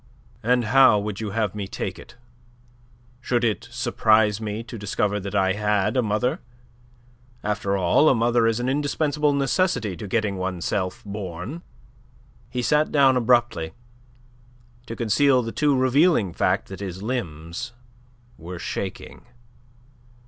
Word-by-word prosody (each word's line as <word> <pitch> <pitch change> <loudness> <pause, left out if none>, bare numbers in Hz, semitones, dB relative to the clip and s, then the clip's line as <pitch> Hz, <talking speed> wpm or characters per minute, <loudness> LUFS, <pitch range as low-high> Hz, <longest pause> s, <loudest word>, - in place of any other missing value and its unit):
"And 125 +1 +2
how 130 -1 +6
would 105 0 -4
you 110 - -3
have 105 -1 -1
me 105 -2 -5
take - - -5
it? - - -14 1.0
Should 120 -1 -1
it 110 -6 -1
surprise 110 -1 +2
me 110 +1 -4
to 120 - -9
discover 105 0 -1
that 100 +1 -6
I 95 -1 +2
had 105 +1 0
a 130 - +3
mother? 110 +3 0 1.0
After 100 -1 -1
all, 95 - +4
a - - +4
mother 115 0 +2
is 115 +1 +1
an 120 - -2
indispensable 150 +2 0
necessity 135 - 0
to 105 - -7
getting 105 -2 -1
one's 95 -2 -3
self 90 -2 -2
born." 100 - -6 0.9
He 125 0 -3
sat 150 +4 +2
down 135 -3 +5
abruptly, 120 -9 +1 1.1
to 115 - -5
conceal 125 +3 +3
the 115 - -4
too 145 0 +2
revealing 130 - +3
fact - - 0
that 95 - -8
his 95 -1 -6
limbs 85 -5 -4 0.7
were 85 +2 -7
shaking. - - -6
110 Hz, 140 wpm, -24 LUFS, 100-125 Hz, 1.1 s, how